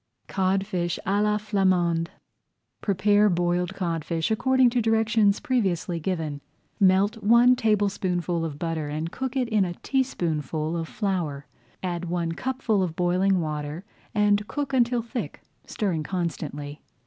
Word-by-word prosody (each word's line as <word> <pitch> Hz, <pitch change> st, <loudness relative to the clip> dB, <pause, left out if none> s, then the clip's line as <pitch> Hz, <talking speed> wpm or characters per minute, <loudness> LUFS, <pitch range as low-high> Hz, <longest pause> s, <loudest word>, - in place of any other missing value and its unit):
CODFISH 190 Hz, -2 st, 0 dB
À 200 Hz, +2 st, +1 dB
LA 210 Hz, 0 st, +2 dB
FLAMANDE 185 Hz, -5 st, +1 dB, 0.7 s
Prepare 205 Hz, +1 st, +3 dB
boiled 175 Hz, 0 st, 0 dB
codfish 165 Hz, -1 st, -2 dB
according 260 Hz, +2 st, +3 dB
to 245 Hz, 0 st, +1 dB
directions 220 Hz, -2 st, +3 dB
previously 190 Hz, -8 st, 0 dB
given. 160 Hz, -4 st, -3 dB, 0.4 s
Melt 200 Hz, +3 st, +3 dB
one 235 Hz, +4 st, +6 dB
tablespoonful 190 Hz, -6 st, 0 dB
of 155 Hz, -3 st, -4 dB
butter 160 Hz, -2 st, -2 dB
and 155 Hz, +3 st, -3 dB
cook 265 Hz, +3 st, -4 dB
in 255 Hz, -2 st, +1 dB
it 215 Hz, -3 st, +2 dB
a 175 Hz, -2 st, -4 dB
teaspoonful 160 Hz, -, -1 dB
of 165 Hz, -1 st, -3 dB
flour. 170 Hz, -10 st, -2 dB, 0.4 s
Add 175 Hz, -1 st, -2 dB
one 170 Hz, -1 st, -1 dB
cupful 240 Hz, +1 st, -1 dB
of 175 Hz, -4 st, -2 dB
boiling 180 Hz, +2 st, +2 dB
water 150 Hz, +2 st, -4 dB, 0.3 s
and 210 Hz, 0 st, +3 dB
cook 285 Hz, 0 st, -3 dB
until 240 Hz, -2 st, +2 dB
thick, 235 Hz, +1 st, -6 dB, 0.2 s
stirring 185 Hz, -8 st, -1 dB
constantly. 150 Hz, -4 st, -4 dB
185 Hz, 130 wpm, -25 LUFS, 165-215 Hz, 0.7 s, one